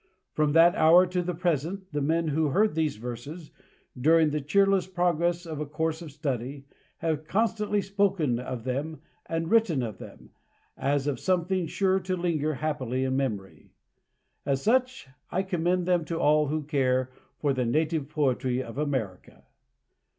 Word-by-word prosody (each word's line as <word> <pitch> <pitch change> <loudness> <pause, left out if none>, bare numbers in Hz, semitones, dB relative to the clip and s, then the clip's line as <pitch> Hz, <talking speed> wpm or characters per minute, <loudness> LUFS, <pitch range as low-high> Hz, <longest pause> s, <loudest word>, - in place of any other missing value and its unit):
From 150 -1 +1
that 165 +2 +6
hour 170 +3 +6
to 180 0 -1
the 180 0 -3
present, 175 +3 -2
the 145 -1 -2
men 160 +3 +1
who 155 +1 +1
heard 205 +8 +2
these 155 -2 0
verses, 125 +8 -8 0.4
during 155 +4 +4
the 150 0 -1
cheerless 195 +5 +2
progress 175 -1 0
of 160 -3 -6
a 150 - -2
course 160 +2 -2
of 160 -3 -8
study, 135 -1 -4 0.3
have 155 -2 -2
constantly 210 0 0
spoken 195 -10 +1
of 125 -2 -5
them 140 +5 -3 0.3
and 165 0 -2
written 200 - +3
of 110 -5 -6
them, - - -12 0.4
as 140 0 0
of 140 -4 -1
something 185 -1 0
sure 190 +3 +1
to 185 0 -3
linger 155 -4 -1
happily 130 -3 -2
in 130 0 0
memory. 110 -8 -4 0.7
As 135 -1 -1
such 255 - +1 0.2
I 190 +2 0
commend 180 -1 0
them 175 -2 +2
to 165 0 -3
all 150 0 +3
who 155 +2 -2
care 130 -3 0 0.3
for 145 -2 0
the 130 -1 0
native 155 +2 0
poetry 130 -4 0
of 115 +3 -8
America. 130 -11 -4
155 Hz, 160 wpm, -27 LUFS, 135-175 Hz, 0.7 s, that